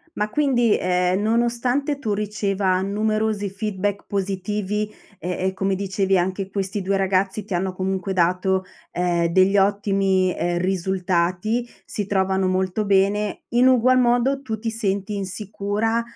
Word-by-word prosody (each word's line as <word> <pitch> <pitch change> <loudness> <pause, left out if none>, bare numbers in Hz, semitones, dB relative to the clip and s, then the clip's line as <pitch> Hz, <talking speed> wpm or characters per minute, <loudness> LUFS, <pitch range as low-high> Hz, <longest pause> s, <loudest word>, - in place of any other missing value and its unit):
Ma 210 0 -1
quindi, 240 -3 +2
ehm, 180 +1 +1
nonostante 240 +5 0
tu 215 -5 -1
riceva 200 -2 0
numerosi 215 +1 0
feedback 200 0 -3
positivi, 205 +2 -2 0.3
e 175 - -5 0.2
e - - -12
come 195 0 -1
dicevi 195 0 0
anche 190 +2 -1
questi 195 0 -2
2 195 +1 0
ragazzi 195 +1 0
ti 200 -2 -5
hanno 185 +2 -1
comunque 190 +1 -2
dato, 185 +1 +1 0.3
ehm, 175 -1 +1
degli 190 +3 +4
ottimi, 195 -2 +2
ehm, 175 0 0
risultati, 185 +3 0 0.2
si 205 -2 -4
trovano 190 -1 +1
molto 185 +3 0
bene, 200 +1 +1
in 245 +2 +4
ugual 255 0 +4
modo 250 +3 +2
tu 220 -5 -4
ti 225 +2 -3
senti 205 -2 -2
insicura, 205 +3 -2
195 Hz, 135 wpm, -22 LUFS, 190-215 Hz, 0.3 s, degli